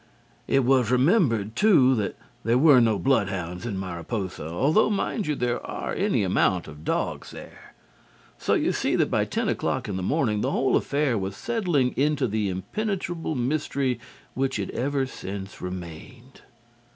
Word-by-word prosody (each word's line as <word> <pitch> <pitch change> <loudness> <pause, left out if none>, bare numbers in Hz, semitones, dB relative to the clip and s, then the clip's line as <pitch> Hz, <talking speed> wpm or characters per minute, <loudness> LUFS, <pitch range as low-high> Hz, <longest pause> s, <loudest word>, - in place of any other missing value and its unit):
It 135 -2 +2
was 130 -3 +3
remembered, 125 - +2
too, 140 - +5
that 105 -5 -2 0.3
there 115 +3 +3
were 140 -2 +7
no 110 -3 +3
bloodhounds 95 -6 -1
in 100 -5 -3
Mariposa, 95 -1 -4
although, 140 - +2
mind 210 -1 -1
you, 150 - 0
there 125 -2 -1
are - - -4
any - - +1
amount 90 -1 +1
of 75 0 -11
dogs - - -2
there. - - -12 0.6
So - - +1
you - - +1
see - - 0
that - - +1
by - - +2
ten - - -2
o'clock 130 -2 -1
in 100 -3 -3
the - - -3
morning 105 - 0
the 130 - 0
whole 135 -1 +1
affair 140 -6 +1
was 95 0 -4
settling 175 - 0
into 145 -1 +1
the 105 -2 -1
impenetrable 170 - -3
mystery 135 0 -1 0.3
which 135 -1 -1
it 100 -2 -3
ever 135 +1 -1
since 100 -6 -7
remained. 90 - -8
125 Hz, 160 wpm, -25 LUFS, 100-140 Hz, 0.6 s, were